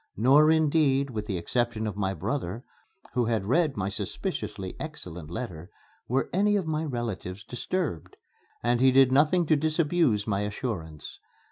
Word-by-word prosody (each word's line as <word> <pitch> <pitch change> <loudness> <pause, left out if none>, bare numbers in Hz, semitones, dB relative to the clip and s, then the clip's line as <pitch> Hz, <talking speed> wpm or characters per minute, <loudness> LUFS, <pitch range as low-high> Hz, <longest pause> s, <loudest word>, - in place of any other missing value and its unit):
Nor, 140 +8 +6
indeed, 150 -4 +3
with 105 -2 -4
the 95 - -2
exception 115 +5 -1
of 105 -3 -3
my 95 -1 -1
brother, 115 - -3 0.5
who 125 -2 +1
had 110 -4 0
read 150 - +2
my 95 -1 -1
suspiciously 95 -1 -4
excellent 90 - -6
letter, 85 -4 -6 0.4
were 130 +3 0
any 205 +3 +3
of 195 -4 0
my 155 0 -1
relatives 115 - -4
disturbed; 130 - -4 0.5
and 120 +1 +2
he 130 0 +6
did 130 0 +5
nothing 155 +6 +4
to 155 - +4
disabuse 155 -7 +1
my 100 -2 0
assurance. 100 - -5
120 Hz, 150 wpm, -27 LUFS, 100-150 Hz, 0.5 s, Nor